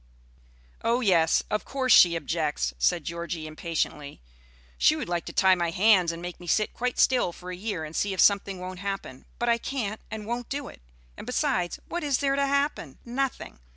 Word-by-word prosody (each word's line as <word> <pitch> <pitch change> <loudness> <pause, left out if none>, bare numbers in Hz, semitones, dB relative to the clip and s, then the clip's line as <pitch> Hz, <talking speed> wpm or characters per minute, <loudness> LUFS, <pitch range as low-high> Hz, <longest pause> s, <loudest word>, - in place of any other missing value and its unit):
"Oh 235 +2 +2
yes, 170 -7 +3
of 210 - 0
course 260 -3 +1
she 170 -2 +7
objects," 150 - -1
said 105 - +2
Georgie, 170 -1 -5
impatiently. 155 -2 -4 0.6
"She - - +5
would - - -4
like 175 -1 -2
to - - -6
tie 190 -1 +4
my 175 -2 0
hands 185 -1 +4
and 170 +1 -8
make 175 0 -6
me 175 - -11
sit 215 +6 +1
quite 250 +1 -2
still 250 -9 +3
for 180 +1 -9
a - - -5
year 185 -3 -4
and 155 +1 -8
see 205 - 0
if 190 - -5
something 200 -2 +3
won't 185 0 -7
happen; 195 -9 -5
but 240 - -2
I 235 0 +3
can't 220 -6 -4
and 215 -1 -6
won't 240 +2 -4
do 280 -1 -4
it; - - -15 0.4
and, - - -9
besides, 250 - 0
what 345 -1 -4
is 285 -3 +1
there 275 0 +1
to 280 0 +1
happen? 280 - -1
Nothing. 255 - -3
190 Hz, 200 wpm, -26 LUFS, 170-245 Hz, 0.6 s, she